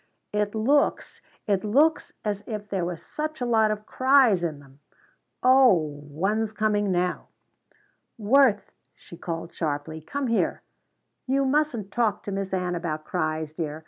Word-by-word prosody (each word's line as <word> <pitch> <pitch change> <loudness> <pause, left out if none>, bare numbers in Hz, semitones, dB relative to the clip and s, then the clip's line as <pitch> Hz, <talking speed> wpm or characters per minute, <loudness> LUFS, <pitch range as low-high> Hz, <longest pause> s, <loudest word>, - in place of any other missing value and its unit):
"It 210 0 -1
looks 275 +7 +1 0.2
it 195 -2 0
looks 285 +10 +2
as 205 -1 -2
if 210 -2 -6
there 190 -3 -1
was 175 -2 -6
such 310 0 -5
a 250 - -1
lot 220 -2 +3
of 215 0 -3
cries 255 -9 +4
in 160 -4 -2
them! 140 0 -19 0.6
o 205 - +4
h - - -13
one's 205 +8 -1
coming 210 -2 +1
now!" 180 0 -1 0.9
"Worth," 230 0 +3 0.2
she - - -14
called 165 0 -6
sharply, 155 0 -3
"come 280 - -4
here. 230 -2 0 0.6
You 275 +1 +2
mustn't 265 -8 0
talk 215 -2 0
to 205 - -5
Miss 195 -1 -3
Ann 180 -1 -1
about 160 -3 -4
cries, 155 -1 -2
dear. 155 -2 -4
205 Hz, 150 wpm, -25 LUFS, 170-240 Hz, 0.9 s, cries